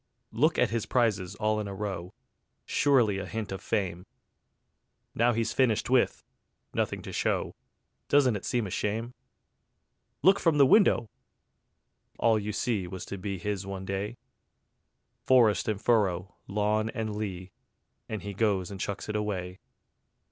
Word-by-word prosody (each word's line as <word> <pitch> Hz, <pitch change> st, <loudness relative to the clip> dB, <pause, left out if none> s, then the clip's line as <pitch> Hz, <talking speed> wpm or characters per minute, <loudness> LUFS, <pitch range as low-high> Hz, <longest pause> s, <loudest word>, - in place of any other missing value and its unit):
Look 150 Hz, +8 st, +2 dB
at 125 Hz, -3 st, +2 dB
his 115 Hz, -2 st, -2 dB
prizes 105 Hz, -7 st, +1 dB
all 110 Hz, 0 st, 0 dB
in 105 Hz, -, -3 dB
a 100 Hz, -, -6 dB
row: 95 Hz, -3 st, -5 dB, 0.5 s
Surely 120 Hz, -9 st, +3 dB
a -, -, -5 dB
hint 110 Hz, -3 st, -4 dB
of 95 Hz, -, -5 dB
fame. 90 Hz, -4 st, -2 dB, 1.1 s
Now 120 Hz, +2 st, +3 dB
he's 115 Hz, 0 st, -1 dB
finished 125 Hz, -2 st, +1 dB
with, 130 Hz, -2 st, +2 dB, 0.5 s
nothing -, -, -1 dB
to -, -, -7 dB
show: -, -, 0 dB, 0.6 s
Doesn't 135 Hz, -5 st, +4 dB
it 100 Hz, -, -5 dB
seem 120 Hz, -3 st, 0 dB
a 95 Hz, -, -6 dB
shame? 115 Hz, +6 st, -2 dB, 1.1 s
Look 195 Hz, +2 st, +6 dB
from 165 Hz, -3 st, +2 dB
the 140 Hz, -, +7 dB
window! 130 Hz, -, +4 dB, 1.1 s
All 115 Hz, -2 st, +3 dB
you 105 Hz, +1 st, -3 dB
see 105 Hz, -4 st, -1 dB
Was 95 Hz, +1 st, -7 dB
to 100 Hz, -, -6 dB
be 100 Hz, +1 st, -3 dB
his 100 Hz, 0 st, -3 dB
one 95 Hz, -1 st, -5 dB
day: 100 Hz, +4 st, -3 dB, 1.1 s
Forest 120 Hz, -5 st, +4 dB
and 105 Hz, -2 st, -1 dB
furrow, 100 Hz, -5 st, +1 dB
lawn 105 Hz, +2 st, 0 dB
and 110 Hz, -3 st, -3 dB
lea, 95 Hz, -3 st, -5 dB, 0.6 s
And 110 Hz, -4 st, -4 dB
he 100 Hz, 0 st, -5 dB
goes 100 Hz, -3 st, 0 dB
and 100 Hz, -, -7 dB
chucks 100 Hz, +1 st, -4 dB
it 105 Hz, -, -3 dB
away. 95 Hz, -3 st, -3 dB
105 Hz, 150 wpm, -28 LUFS, 95-115 Hz, 1.1 s, the